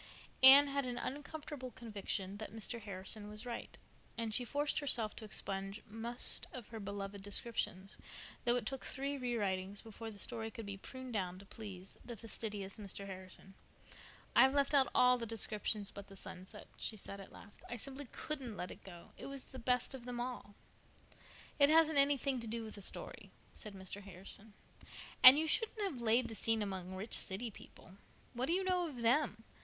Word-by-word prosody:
Anne 270 +2 +12
had 280 0 0
an 245 0 -3
uncomfortable 290 -1 -5
conviction 205 -4 -4
that 215 - -6
Mr. 225 +2 -1
Harrison 205 +1 -5
was 210 +3 -6
right, 240 -1 -6 0.4
and 225 -2 -2
she 245 - +2
forced 290 +4 0
herself 235 -7 +1
to 220 - -7
expunge 195 0 -2
most 230 +3 0
of 245 -4 -8
her 225 - -6
beloved 200 0 -5
descriptions, 200 -2 +1 0.4
though 240 0 +4
it 245 -3 -1
took 270 +3 -3
three 275 +1 -2
re 250 -3 -2
writings 195 -1 -1
before 225 0 -7
the 210 - -10
story 225 +1 -2
could 225 -1 -7
be 200 -1 -5
pruned 260 +5 -8
down 185 -4 -1
to 195 - -12
please 195 -3 -9
the 235 -2 -7
fastidious 210 -3 -5
Mr. 200 -1 -5
Harrison. 190 0 -9 0.8
"I've 265 +1 +7
left 280 0 +3
out 270 -3 +5
all 250 0 +6
the 230 - -3
descriptions 215 -2 +1
but 200 0 -9
the 195 - -12
sunset," 185 -1 -8
she 220 - -4
said 200 0 -4
at 195 - -12
last. 205 - -13
"I 240 - -4
simply 275 +3 -5
couldn't 265 -8 -2
let 180 - -4
it - - -12
go. 175 -3 -11
It - - -5
was 275 -1 -3
the 260 - -10
best 250 +1 +1
of 255 -3 -8
them 245 -1 -4
all." 240 -4 -5 1.0
"It 285 0 +8
hasn't 315 -2 +6
anything 275 -2 +4
to 230 - -6
do 230 +1 -3
with 220 - -7
the 205 - -5
story," - - -3 0.2
said 210 -3 -4
Mr. 190 +1 -6
Harrison, 200 +2 -7 0.7
"and 255 +2 +12
you 315 - +3
shouldn't 435 +7 +2
have 350 -12 -2
laid 235 +2 +4
the - - -7
scene 225 0 +1
among 190 -2 -4
rich 200 +5 -5
city 220 +5 +1
people. 190 -1 -14 0.4
What 250 +2 -1
do 335 - +2
you 380 +2 +2
know 365 -2 +2
of 250 -6 -6
them? 235 -2 +3
225 Hz, 190 wpm, -36 LUFS, 200-260 Hz, 1.0 s, Anne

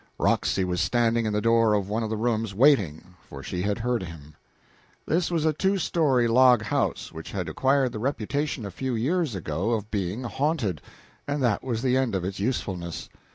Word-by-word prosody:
Roxy 95 - +1
was 90 -1 -1
standing 115 -1 +2
in 105 - -1
the 105 - +1
door 115 -2 +4
of 100 -2 -1
one 110 +3 -1
of 110 - -2
the 110 - -2
rooms, 110 -3 -1
waiting, 95 - +3 0.2
for 70 -1 -9
she 90 - -3
had 100 +3 0
heard 120 0 -1
him. 80 -4 -9 0.7
This 170 +2 +1
was 165 -3 0
a 155 - +3
two 190 +6 +1
story 145 -9 +2
log 125 0 +5
house 105 - -1
which 80 0 -9
had 90 -4 -3
acquired 130 - +2
the 110 - -5
reputation 135 +1 -2
a 100 - -6
few 130 +7 -3
years 145 - 0
before 95 +6 -1
of 105 0 -9
being 100 +4 -2
haunted, 125 - -1 0.5
and 145 -1 -1
that 115 -5 +1
was 120 -2 -2
the 130 -1 +2
end 130 -6 0
of 90 -2 -2
its 95 +1 -4
usefulness. 95 -6 -3
115 Hz, 200 wpm, -26 LUFS, 95-130 Hz, 0.7 s, log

